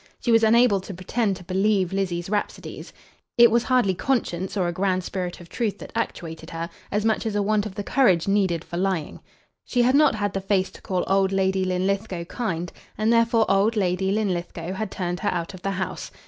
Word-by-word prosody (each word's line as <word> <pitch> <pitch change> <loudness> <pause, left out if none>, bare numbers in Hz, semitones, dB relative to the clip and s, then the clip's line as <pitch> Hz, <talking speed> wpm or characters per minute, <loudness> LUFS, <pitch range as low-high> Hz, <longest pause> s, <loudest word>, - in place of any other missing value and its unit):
She 240 - 0
was 225 0 +6
unable 225 -2 +5
to 190 0 -8
pretend 195 +3 -1
to 180 - -11
believe 190 0 +1
Lizzie's 180 -3 -1
rhapsodies. 205 +1 -4 0.5
It 235 -1 +8
was 235 +1 +4
hardly 250 -7 +3
conscience 190 -4 -1
or 180 -3 +1
a - - 0
grand 185 0 0
spirit 180 -1 -4
of 175 - -12
truth 220 +2 -2
that - - -10
actuated 160 -1 -4
her, 165 +1 -5 0.2
as 210 +1 -1
much 220 -1 +1
as 215 - -2
a 205 - +2
want 210 0 +1
of 190 - -10
the 205 - -3
courage 200 - +3
needed 190 -5 +1
for 170 - -6
lying. 185 -4 -1 0.4
She 245 -1 +1
had 255 +2 +3
not 300 -2 +5
had 205 -1 -2
the 195 - -2
face 190 -1 0
to - - -14
call 185 -2 -1
old 195 0 +2
Lady 190 0 +1
Linlithgow 185 0 -1
kind, 175 -4 -3 0.3
and 215 +2 +2
therefore 230 -1 +3
old 200 +4 +3
Lady 190 -1 +1
Linlithgow 180 -4 -2
had 215 +1 -3
turned 180 -2 -3
her - - 0
out 170 +1 -3
of 185 - -10
the 195 - -2
house. 190 0 -4
195 Hz, 210 wpm, -24 LUFS, 180-215 Hz, 0.5 s, It